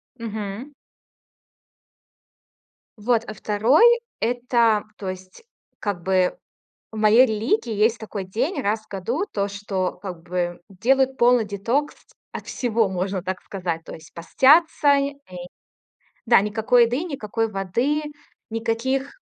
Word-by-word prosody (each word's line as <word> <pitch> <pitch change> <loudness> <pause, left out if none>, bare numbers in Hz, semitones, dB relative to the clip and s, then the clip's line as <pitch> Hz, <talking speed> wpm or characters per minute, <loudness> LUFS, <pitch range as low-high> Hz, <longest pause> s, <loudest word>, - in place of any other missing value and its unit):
Мгм. 220 +3 -6 2.2
Вот, 225 +1 +1
а 215 - -5
2- 220 - +3 0.4
это, 235 -2 +2
то 195 - -7
есть 185 - -9 0.4
как 200 -4 -3
бы 185 0 +1 0.6
в - - -8
моей 220 +4 +6
религии 230 - 0
есть 220 +2 +2
такой 210 -3 -6
день 245 - -2
раз 210 +2 0
в - - -28
году, 230 - -2
то, 200 -1 -1
что 195 -2 -3
как 180 -4 -7
бы 175 0 -3
делают 265 +7 +1
полный 240 -2 +4
детокс 230 +9 -1 0.4
от - - -7
всего, 230 -4 0
можно 190 0 -2
так 185 0 -4
сказать. 175 -4 -4
То - - -9
есть 160 0 -14
постятся. 285 - +4
И 280 0 0 0.2
и, 180 - -9 0.9
да, 235 -3 +6
никакой 220 +4 +3
еды, 245 +7 -2
никакой 225 - -3
воды, 235 +11 -1 0.5
никаких 235 +5 -1
220 Hz, 130 wpm, -23 LUFS, 195-250 Hz, 2.2 s, моей